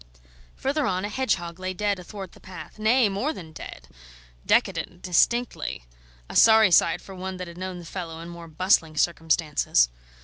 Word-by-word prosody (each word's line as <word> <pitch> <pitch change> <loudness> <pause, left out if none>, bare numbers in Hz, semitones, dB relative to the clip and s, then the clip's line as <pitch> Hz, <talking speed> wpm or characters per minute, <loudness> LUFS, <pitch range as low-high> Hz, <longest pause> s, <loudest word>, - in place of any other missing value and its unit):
Further 280 +1 -1
on, 185 0 -1
a - - -3
hedgehog 185 -8 -1
lay 185 0 -4
dead 205 -1 0
athwart 190 0 -8
the - - -17
path 185 +2 -11
nay, 225 +2 +4
more 205 +11 -1
than 165 - -10
dead; - - -10 0.6
decadent, 180 0 0
distinctly; 185 - +1 0.4
a - - -9
sorry 220 -3 +7
sight 170 -1 +4
for 195 - -11
one 185 0 -6
that 180 -1 -6
had 170 - -10
known 185 -1 -5
the 175 - -10
fellow 165 -2 -6
in 165 - -8
more 170 -1 -9
bustling 160 -1 +1
circumstances. 155 - +2
185 Hz, 170 wpm, -25 LUFS, 170-205 Hz, 0.6 s, sorry